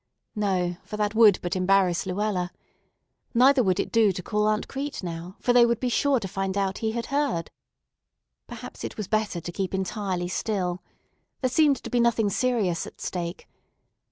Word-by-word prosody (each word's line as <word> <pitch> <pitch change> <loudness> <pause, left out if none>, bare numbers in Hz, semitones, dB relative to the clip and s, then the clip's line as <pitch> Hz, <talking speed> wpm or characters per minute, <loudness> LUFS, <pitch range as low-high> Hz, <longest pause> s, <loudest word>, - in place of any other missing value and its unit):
No, 185 -4 0
for 210 - -7
that 210 0 0
would 220 -4 +6
but 175 +2 -2
embarrass 185 -1 +2
Luella. 185 -2 -1 0.8
Neither 260 +3 +6
would 190 -4 +1
it - - -2
do 225 -3 +4
to 180 - -6
call 210 +2 0
Aunt 215 0 0
Crete 280 -4 -5
now, 170 +1 -6
for 245 - +2
they 245 -1 +7
would 235 -1 +2
be 250 - -1
sure 275 +2 +2
to 200 - -5
find 195 +1 -3
out 195 -1 -1
he 220 -1 -1
had 235 -1 -3
heard. 280 - 0 1.0
Perhaps - - -9
it - - -6
was 210 -4 -4
better 215 -5 0
to 175 - -6
keep 190 +1 -3
entirely 190 -2 -2
still. 185 -2 -2 0.6
There 255 -2 +1
seemed 290 -1 +4
to - - -6
be 245 - +2
nothing 230 -3 +2
serious 215 -7 0
at - - -13
stake. 175 -1 -5
205 Hz, 185 wpm, -26 LUFS, 185-235 Hz, 1.0 s, they